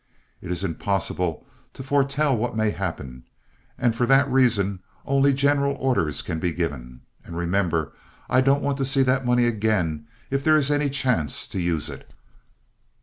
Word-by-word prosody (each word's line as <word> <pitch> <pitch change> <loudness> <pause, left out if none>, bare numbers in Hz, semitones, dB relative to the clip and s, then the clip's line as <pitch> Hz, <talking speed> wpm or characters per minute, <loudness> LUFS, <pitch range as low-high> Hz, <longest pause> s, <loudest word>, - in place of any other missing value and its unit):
It 90 - -6
is 90 +1 -3
impossible 90 -2 -2 0.3
to 130 - -8
foretell 140 +1 +1
what 115 +1 -2
may 110 -1 +2
happen, 70 -11 -6 0.5
and 120 -2 +1
for 120 +1 0
that 135 +2 +5
reason 105 -7 +2 0.3
only 140 +1 +3
general 140 +1 +2
orders 125 - 0
can 80 - -4
be 85 +1 -1
given. 65 -8 -5 0.2
And 85 - -8
remember, 85 -3 0 0.3
I 130 - +3
don't 135 +2 +2
want 140 -1 -1
to - - +1
see 135 0 +3
that 130 0 +1
money 125 0 +3
again 110 -6 0 0.2
if 135 0 -1
there 155 +1 +5
is 150 -1 +2
any 145 0 +1
chance 125 - -1
to - - -4
use 85 -3 -1
it." - - -9
115 Hz, 165 wpm, -24 LUFS, 85-135 Hz, 0.5 s, that